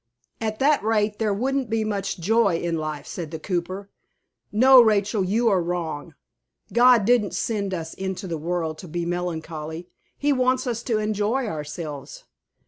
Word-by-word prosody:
"At 215 -1 -2
that 285 +1 +3
rate 210 -1 +1
there 220 -2 +1
wouldn't 260 +4 -1
be 220 0 0
much 200 -3 -2
joy 200 0 +3
in 170 0 -2
life," 155 -2 -4
said 170 -4 -6
the 160 - -5
cooper. 185 +3 -4 0.6
"No, 255 +4 +8
Rachel, 210 -2 +2
you 220 +6 +1
are 190 -4 +3
wrong. 170 -4 -4 0.6
God 240 -3 +6
didn't 235 -3 +2
send 205 -4 -1
us 165 -3 -4
into 190 0 -4
the 165 -3 -4
world 165 -1 -2
to 180 - -9
be 170 +1 -3
melancholy. 165 -1 -4 0.3
He 290 0 +2
wants 255 0 +1
us 235 -2 -2
to 230 -3 +1
enjoy 215 +4 0
ourselves. 150 -5 -6
200 Hz, 160 wpm, -24 LUFS, 170-225 Hz, 0.6 s, No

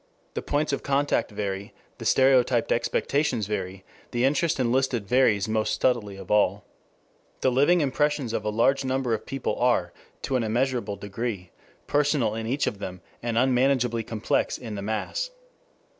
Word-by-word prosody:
The - - -3
points 145 0 0
of - - -1
contact 140 +1 +1
vary, 100 -1 -4 0.2
the - - -7
stereotyped 130 -2 +3
expectations 120 0 0
vary, 95 -2 -4 0.2
the 120 +1 +1
interest 150 +3 +1
enlisted 125 -2 +1
varies 115 -5 +3
most 110 0 0
subtly 115 -6 +1
of 95 -1 -9
all. 105 0 +3 0.8
The 130 - +3
living 145 +7 +4
impressions 145 -3 0
of - - -1
a 105 - -1
large 135 +6 +2
number 130 -2 0
of 110 - -3
people 135 -2 -3
are 120 -8 +2 0.3
to 130 - 0
an 120 - 0
immeasurable 120 -2 0
degree 100 -2 -5 0.3
personal 145 -6 +1
in 110 0 -4
each 135 +4 0
of 100 - -3
them, 90 -2 -6 0.2
and 115 -1 -2
unmanageably 125 -2 +2
complex 110 -1 -1
in 115 -4 -7
the 100 - -4
mass. 110 - -2
120 Hz, 160 wpm, -26 LUFS, 105-135 Hz, 0.8 s, living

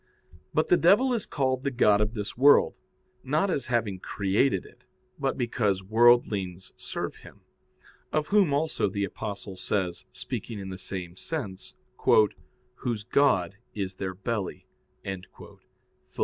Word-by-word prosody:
But 155 - +1
the 175 - +6
devil 210 +10 +4
is 230 - -2
called 130 -2 0
the 140 - +1
god 105 -5 +4
of 105 +2 -1
this 105 -2 -4
world, 140 +4 +6 0.5
not 155 +8 +1
as 140 -7 -2
having 115 -6 0
created 100 +3 0
it, - - -18 0.4
but 135 -1 -1
because 105 -6 0
worldlings 100 -4 +3
serve - - -5
him, - - -15 0.7
of 155 -1 0
whom 200 -6 +4
also 145 -6 +1
the 100 +1 -2
Apostle 100 -1 -5
says, 90 -4 -2
speaking 115 - -5
in 95 -1 -6
the 95 -1 -7
same 90 -2 -6
sense, 100 - -6 1.0
"Whose 115 -4 -3
god 100 -8 +2 0.2
is 95 -3 -3
their 95 -1 -4
belly" 100 0 -3 0.4
(Phil. 95 -1 -9
105 Hz, 135 wpm, -27 LUFS, 95-140 Hz, 1.0 s, the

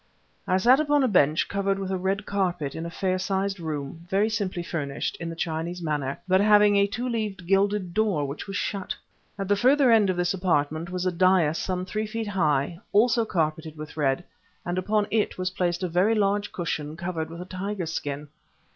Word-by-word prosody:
I 185 - +3
sat 245 +8 +5
upon 290 -2 +3
a - - +4
bench 155 - +3
covered 195 0 0
with 195 -1 -4
a 190 - 0
red 195 +2 -1
carpet, 180 -8 -1
in 165 +1 -5
a - - -5
fair 185 +2 -1
sized 195 +1 -1
room, 160 +1 -5
very 200 +3 +2
simply 195 -5 -2
furnished, 145 -5 -3
in 170 - -4
the 165 - -6
Chinese 165 +2 -3
manner, 150 -5 -2
but 185 +1 +4
having 210 0 +6
a 200 0 +4
two 240 +5 -3
leaved, 215 -6 -3
gilded 195 -1 +1
door, 205 -9 +1
which 140 +7 -6
was 195 - -5
shut. 200 -1 -2 0.4
At 195 -1 -3
the 205 - +3
further 260 +4 +4
end 215 -4 +5
of 185 - 0
this 180 +1 +1
apartment 165 -3 0
was 180 0 -3
a 185 - +2
dais 175 -3 +3
some 185 -1 -2
three 215 +3 -3
feet 225 0 -4
high, 160 -4 +1
also 230 +2 +4
carpeted 160 -4 -2
with 155 0 -8
red, 140 +1 +1 0.4
and 175 +1 -1
upon 210 +3 +1
it 215 -1 0
was 185 0 -1
placed 175 -1 -1
a - - +1
very 185 +6 +2
large 205 -1 +1
cushion 160 -3 -3
covered 170 -2 -3
with 165 +1 -8
a 180 - -6
tiger 190 0 -4
skin. 145 -2 -4
185 Hz, 205 wpm, -26 LUFS, 165-205 Hz, 0.4 s, having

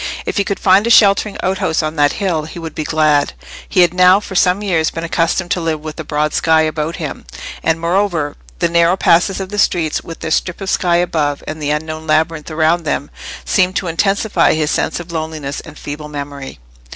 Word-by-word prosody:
If - - -3
he 200 - +3
could 200 0 -3
find 195 +3 +4
a - - +1
sheltering 205 -2 +4
outhouse 185 -4 0
on 155 +1 -3
that 145 -1 +3
hill, 175 -6 -1
he 160 - -10
would 165 -2 -6
be 155 - -3
glad: 150 -2 +2 0.4
he 185 - +3
had 175 -1 +4
now 185 +1 +5
for 205 - -9
some 185 +2 +2
years 165 -6 +1
been 165 - -6
accustomed 170 +1 0
to 180 - 0
live 160 -2 -2
with 155 +1 -8
a - - -3
broad 150 0 -1
sky 160 -1 +3
about 155 +1 -2
him; - - -6 0.3
and, 160 0 +1
moreover, 170 -3 0 0.2
the - - +1
narrow 170 +2 +3
passes 180 +2 +3
of 190 -1 -5
the 205 0 -3
streets, 165 -5 +1
with 165 - -9
their 160 - -4
strip 180 +2 0
of 195 -2 -3
sky 175 -2 +1
above, 155 -5 0
and 155 0 -6
the 145 - -2
unknown 155 +1 -3
labyrinth 155 0 0
around 160 +2 +1
them, 150 -2 -3 0.3
seemed 185 -1 +1
to 195 - -1
intensify 195 +2 +1
his 155 -1 0
sense - - -1
of 175 0 -9
loneliness 155 -3 -4
and 150 -2 -12
feeble 150 +1 -7
memory. 140 -2 -7
165 Hz, 210 wpm, -16 LUFS, 155-185 Hz, 0.4 s, now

